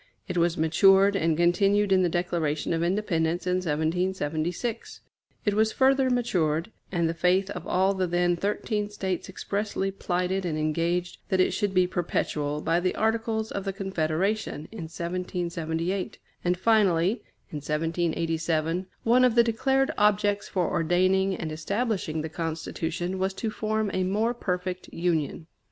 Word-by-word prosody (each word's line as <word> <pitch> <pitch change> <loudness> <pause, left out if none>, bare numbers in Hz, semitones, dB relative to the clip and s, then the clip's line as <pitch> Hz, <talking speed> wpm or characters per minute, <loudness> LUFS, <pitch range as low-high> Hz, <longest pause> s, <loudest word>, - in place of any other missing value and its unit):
It 180 - -4
was 170 0 +2
matured 195 +5 +5
and 165 -4 +1
continued 195 +4 +3
in 190 -1 +5
the 180 - +2
Declaration 170 -3 -1
of 165 - 0
Independence 175 -2 0
in 180 0 +1
1776. 170 +4 -2 0.4
It 205 - +2
was 220 +1 +2
further 265 +1 +3
matured, 180 -9 0 0.2
and 170 -3 +1
the 165 - -1
faith 180 +4 +2
of - - -6
all 190 +2 +2
the 190 -1 -1
then 175 0 +2
thirteen 205 +2 -2
States 190 -3 -3
expressly 200 0 -2
plighted 185 0 -1
and 165 -4 -2
engaged 170 +3 -1
that 190 - +1
it 185 - +4
should 205 -3 -1
be 185 0 +5
perpetual, 150 -4 -2
by 165 +2 +1
the 180 +1 -1
Articles 220 0 0
of 200 - -3
the 195 - -2
Confederation, 190 -2 -1
in 215 -7 -6
1778; 170 0 -3 0.3
and 180 0 +1
finally, 190 -4 +3 0.4
in 150 - -4
1787, 165 +2 -1 0.2
one 245 +2 +4
of 250 -2 +4
the 235 - +7
declared 265 +4 +1
objects 205 -1 +2
for 180 -3 0
ordaining 185 +3 +2
and 160 -2 -5
establishing 180 -1 -2
the - - -2
Constitution 165 +3 -3
was 190 0 -1
to 220 +1 -3
form 215 -1 -1
a 185 - +1
more 210 +6 +1
perfect 180 -4 -3
Union. 165 -2 -1
180 Hz, 150 wpm, -27 LUFS, 165-200 Hz, 0.4 s, the